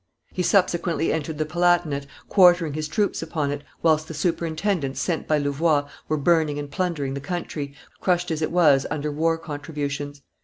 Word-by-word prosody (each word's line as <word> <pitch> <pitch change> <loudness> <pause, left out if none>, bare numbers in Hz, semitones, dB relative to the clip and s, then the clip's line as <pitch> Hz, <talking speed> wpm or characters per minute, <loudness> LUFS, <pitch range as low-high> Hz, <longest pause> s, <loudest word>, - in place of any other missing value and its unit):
He 185 - -1
subsequently 175 -3 +2
entered 160 -1 -3
the 155 - 0
Palatinate, 175 -4 +1 0.2
quartering 175 -5 +5
his 155 +1 -3
troops 205 +6 0
upon 155 -3 -2
it, 145 0 -4 0.2
whilst 155 -1 +3
the 160 - -7
superintendents 165 -2 -1
sent 170 -3 -1
by 155 - +3
Louvois 145 +1 +1 0.2
were 155 - 0
burning 155 -1 +2
and 145 -1 -5
plundering 150 -6 -1
the 140 - -3
country, 145 -3 -4 0.2
crushed 180 -1 +1
as 160 -1 -2
it 155 - 0
was 150 -6 +4
under 150 0 -2
war 165 +2 +1
contributions. 145 -2 -5
155 Hz, 165 wpm, -24 LUFS, 145-170 Hz, 0.2 s, quartering